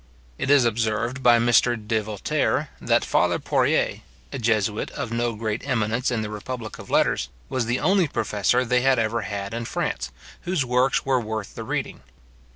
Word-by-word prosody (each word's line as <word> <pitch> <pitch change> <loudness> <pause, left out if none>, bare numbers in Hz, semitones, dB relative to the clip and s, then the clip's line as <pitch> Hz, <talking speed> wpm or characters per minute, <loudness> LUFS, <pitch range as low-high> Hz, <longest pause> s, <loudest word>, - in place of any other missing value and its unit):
It - - -2
is 140 -3 +6
observed 115 +3 -1
by 120 -2 +6
Mr. 120 +1 +3
de 110 0 -1
Voltaire, 105 -1 -1
that - - +2
father - - +2
Porée, - - +1 0.3
a - - -3
jesuit 110 -2 0
of 115 - -5
no 120 0 -1
great 110 0 -3
eminence 115 +1 0
in 115 -3 -1
the 105 - -4
republic 110 +1 -6
of - - -11
letters, - - +2 0.2
was 125 -3 -1
the 120 +2 0
only 190 -3 +3
professor 120 -1 +1
they 125 +1 +2
had 135 0 +3
ever 115 0 0
had 100 0 -5
in 115 0 -3
France, 60 - -2 0.3
whose 175 -6 -1
works 125 +2 +2
were 130 -2 +2
worth 110 -2 -5
the - - -6
reading. - - -3
115 Hz, 175 wpm, -24 LUFS, 110-125 Hz, 0.3 s, is